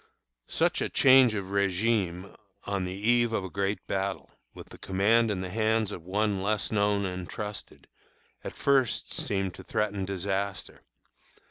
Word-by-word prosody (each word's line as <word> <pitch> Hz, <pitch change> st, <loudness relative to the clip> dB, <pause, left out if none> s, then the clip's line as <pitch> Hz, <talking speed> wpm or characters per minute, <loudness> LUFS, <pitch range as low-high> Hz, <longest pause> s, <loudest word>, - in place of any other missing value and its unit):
Such -, -, 0 dB
a -, -, -1 dB
change 130 Hz, -4 st, +6 dB
of 100 Hz, -2 st, -3 dB
régime 100 Hz, -2 st, 0 dB, 0.3 s
on 100 Hz, -2 st, -2 dB
the 90 Hz, +1 st, -5 dB
eve 120 Hz, +3 st, +2 dB
of 100 Hz, -, 0 dB
a 95 Hz, -, -7 dB
great 100 Hz, +1 st, -2 dB
battle, 95 Hz, 0 st, -3 dB, 0.2 s
with -, -, -12 dB
the -, -, -13 dB
command 110 Hz, +5 st, +2 dB
in 95 Hz, -3 st, -2 dB
the 90 Hz, -1 st, -5 dB
hands 110 Hz, 0 st, +1 dB
of 90 Hz, -, -7 dB
one 100 Hz, +2 st, -1 dB
less 105 Hz, +1 st, 0 dB
known 100 Hz, -1 st, +1 dB
and 90 Hz, -1 st, -5 dB
trusted, 105 Hz, -1 st, -7 dB, 0.6 s
at -, -, -7 dB
first 135 Hz, -4 st, +1 dB
seemed 95 Hz, -2 st, -1 dB
to -, -, -11 dB
threaten 105 Hz, -2 st, -1 dB
disaster. 95 Hz, +1 st, -3 dB
100 Hz, 155 wpm, -28 LUFS, 95-110 Hz, 0.6 s, change